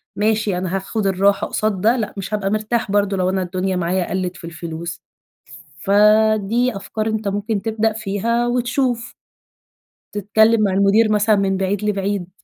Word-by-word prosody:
ماشي 215 -2 0
أنا 185 +1 -2
هاخد 195 +2 -2
الراحة 195 +1 +2
قصاد 215 -3 -1
ده 230 +5 +3
لأ، 215 -3 -3
مش 195 +2 -5
هابقى 200 -2 -1
مرتاح 215 0 -1
برضه 200 -1 +1
لو 185 0 +1
أنا 190 0 0
الدنيا 185 +1 -2
معايا 180 +1 -1
قلّت 185 -1 -3
في - - -13
الفلوس. 165 0 -6 0.8
فدي 215 +3 +3
أفكار 215 +2 -4
أنت 220 -1 -1
ممكن 205 +1 -2
تبدأ 220 0 0
فيها، 220 +3 -1
وتشوف. 245 0 -1 1.0
تتكلم 220 +2 +3
مع 195 -2 +1
المدير 200 +3 +3
مثلًا 210 +1 +3
من 195 -1 0
بعيد 195 +1 -1
لبعيد. 200 -3 -1
205 Hz, 155 wpm, -20 LUFS, 190-220 Hz, 1.0 s, ده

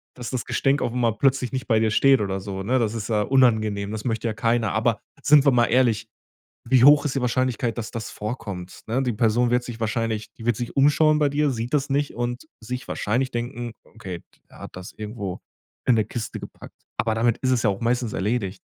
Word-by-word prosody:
dass 125 0 -6
das 130 - -2
Gestänk 135 +3 +1
auf'm 120 - -2
mal 120 -3 +2
plötzlich 130 -1 +1
nicht 130 0 -4
bei 110 -2 +3
dir 110 -1 +1
steht 135 +3 +5
oder 95 -1 -2
so, 95 0 -5
ne? 130 +6 +1
Das 110 -2 0
ist 110 -1 -4
ja 105 -2 +2
unangenehm, 110 -5 +2
das 110 -1 -5
möchte 115 -1 -1
ja 110 - -1
keiner, 115 0 0
aber 110 0 +1 0.2
sind 145 -1 +6
wir 140 - +6
mal 120 -1 +3
ehrlich, 120 -3 +2 0.6
wie 125 +1 +4
hoch 145 +2 +7
ist 140 - -1
die 135 - 0
Wahrscheinlichkeit, 125 -1 0
dass 115 -2 -5
das 115 -1 -5
vorkommt, 100 -5 -6
ne? 125 +4 0
Die 125 - 0
Person 115 +2 +2
wird 125 0 +2
sich 120 -2 -8
wahrscheinlich 110 -1 -2
die 115 - -11
wird 120 -2 +1
sich 120 - -5
umschauen 150 +2 +4
bei 145 - +3
dir, 145 +1 +1
sieht 120 0 -4
das 145 -1 +1
nicht 140 +1 0
und 120 +3 -3
sich 125 +3 -6
wahrscheinlich 130 +5 -1
denken: 120 0 -4
„Okay, 95 -6 -8 0.3
der - - -16
hat - - -10
das 90 0 -8
irgendwo 105 -3 -6 0.5
in 125 - +4
'ne 110 - +3
Kiste 115 -3 -5
gepackt“, - - -11 0.2
aber 110 -1 0
damit 115 0 +2
ist 130 - 0
es 125 -2 +1
ja 105 - +4
auch 100 - -6
meistens 120 -1 0
erledigt. 100 -2 -2
120 Hz, 225 wpm, -24 LUFS, 110-130 Hz, 0.6 s, hoch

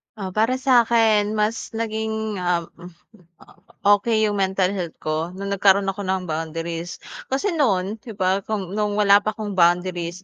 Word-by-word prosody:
Ah, 195 -3 -6
para 225 +6 +1
sa'kin 230 -5 +3
mas 215 +2 -2
naging, 220 -2 -3
um, 175 -1 0
hmm, 180 +4 -16 0.2
opo, - - -21 0.3
okey 220 0 +1
'yung 205 -1 0
mental 190 -1 +1
health 175 -4 -4
ko 155 +3 -2
no'ng 200 +1 -5
nagkaroon 195 0 +3
ako 195 +1 -4
ng 190 0 -1
boundaries. 165 +2 -4 0.3
Kasi 275 +10 -1
non 210 - 0
'di 225 +1 -10
ba, 190 0 +1
kung 200 -4 -3
no'ng 210 0 -1
wala 200 -1 +5
pa 215 +1 -3
akong 210 -2 -5
boundaries 175 0 +1
200 Hz, 165 wpm, -22 LUFS, 180-220 Hz, 0.3 s, wala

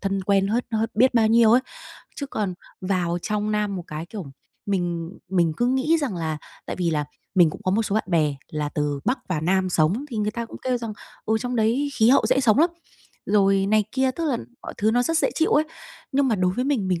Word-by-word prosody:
thân 195 -1 -1
quen 195 0 +2
hết 235 +3 0
hết 225 +1 0
biết 255 +3 +4
bao 225 -2 +4
nhiêu 225 -1 +5
ấy. 245 - +6 0.6
Chứ 280 - -4
còn 205 -8 -3 0.3
vào 180 -2 0
trong 210 0 -1
Nam 210 -2 0
một 175 - -6
cái, 155 +2 -6
kiểu, 200 0 -7 0.4
mình 175 -4 -1 0.2
mình 175 -4 +2
cứ 240 - +1
nghĩ 265 +6 +2
rằng 250 -10 -2
là 160 -2 -2 0.3
tại - - -4
vì 175 -2 0
là 150 -2 0 0.3
mình 175 -5 +5
cũng - - -10
có 185 - +1
một 220 +4 +2
số 205 - -2
bạn 220 - +1
bè 155 -5 +2 0.2
là 150 -1 -2
từ 145 -1 -2
Bắc 255 +2 +1
vào 165 -4 -1
Nam 185 +2 +1
sống 175 - +1
thì 235 - -5
người 210 0 0
ta 235 +2 -4
cũng - - -10
kêu 255 -1 0
rằng, 230 -2 -5 0.3
ừ, 220 +1 +1
trong 245 0 -3
đấy 235 +6 +1
khí 220 +1 +4
hậu 255 -4 +4
dễ 255 +3 +3
sống 230 -1 +3
lắm, 335 +3 +4 0.6
rồi 195 -1 +3
này 215 +1 +3
kia, 265 0 +2
tức 330 +6 -4
là 280 -6 +1 0.3
mọi - - -7
thứ 215 +1 +2
nó 245 +2 +2
rất 330 +4 +1
dễ - - +2
chịu 325 - +1
ấy. 305 - +4 0.5
Nhưng 270 0 +2
mà 225 - +2
đối 185 -2 +1
với 250 +6 -1
mình, 255 -9 0
mình 180 -3 0
210 Hz, 245 wpm, -24 LUFS, 180-245 Hz, 0.6 s, ấy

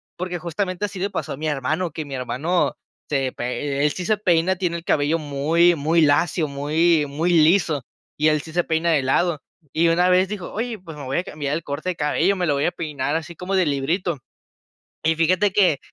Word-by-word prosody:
porque, 180 0 -4
justamente, 185 +3 -2
así 200 -2 -6
le 195 +2 -1
pasó 195 - -4
a - - -7
mi 155 +2 -3
hermano, 155 +5 -1
que 155 0 -5
mi 140 - -8
hermano 140 +8 0 0.4
se 135 -3 0
pe 140 +3 -3
e - - +3
él 150 - +3
sí 180 - -5
se 215 - +3
peina. 185 -3 +2
Tiene 175 -2 -2
el 170 - -10
cabello 150 +3 +1
muy, 155 +4 +2
muy 160 +3 +1
lacio, 155 +2 +3
muy, 150 +3 +2
muy 155 +5 -1
liso 160 -3 +3 0.3
y 155 +1 +3
él 155 -1 +1
sí 160 +1 -11
se 175 +1 +2
peina 165 +1 0
de 150 -4 +2
lado, 155 +4 +1 0.3
y 165 +2 +3
una 175 +2 +3
vez 185 +1 +4
dijo: 200 -4 -6
"Oye, 230 0 -3
pues 165 -4 -10
me 145 - -7
voy 135 +1 -2
a - - -2
cambiar 145 -5 -4
el 160 +1 -2
corte 145 +5 -4
de 180 - -2
cabello, 160 +6 +1
me 180 - 0
lo 150 - +2
voy 140 0 0
a - - +1
peinar 150 -3 -3
así 165 +1 -7
como 180 +4 -3
de 185 -2 +3
librito". 155 +4 -1 0.9
Y 160 +1 +2
fíjate 180 +5 +2
que 185 -7 +3
165 Hz, 225 wpm, -22 LUFS, 145-180 Hz, 0.9 s, vez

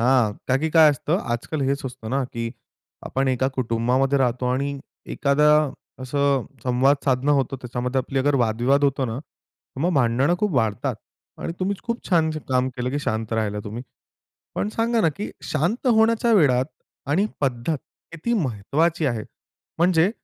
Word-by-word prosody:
हां, 125 0 +4 0.2
कारण 130 +2 +2
की 160 - +1
काय 160 -1 +9
असतं 150 +4 -1 0.2
आजकाल 140 +5 -3
हेच 140 +1 0
सुचतं 125 -3 -7
ना, 140 - +2
की 115 0 -3 0.6
आपण 135 0 0
एका 130 +1 +1
कुटुंबामध्ये 125 +3 +1
राहतो 125 -1 +1
आणि 140 +2 -1 0.4
एखादं 150 0 +3 0.3
असं 140 0 +1 0.2
संवाद 130 +3 +3
साधणं 135 +2 +2
होतं, 135 0 -1
त्याच्यामध्ये 125 +2 -2
आपला 135 +1 +1
वादविवाद 120 +6 +2
होतो 135 -1 +1
ना, 115 +1 -3
तर 140 -2 -15
मग 175 +2 +1
भांडणं 135 +5 +3
खूप 210 -3 0
वाढतात 110 -4 0 0.5
आणि - - -3
तुम्हीच 195 +1 -1
खूप 235 0 -4
छान 165 -4 +3 0.2
काम 130 0 +2
केलं 125 +1 -2
की 145 - -1
शांत 110 -4 -2
राहिलात 105 -2 -1
तुम्ही. 110 +4 -6 0.7
पण 210 - -1
सांगा 230 +1 +1
ना, 165 - +4
की 200 +8 -6 0.2
शांत 175 - 0
होण्याच्या 230 +1 +4
वेळात 130 -9 +4 0.5
आणि 190 +7 +3 0.2
पद्धत 135 +3 0 0.3
किती 165 +9 -2
महत्त्वाची 150 - 0
आहे. 115 -5 -1 0.5
म्हणजे 175 +1 +4
135 Hz, 155 wpm, -23 LUFS, 125-160 Hz, 0.7 s, काय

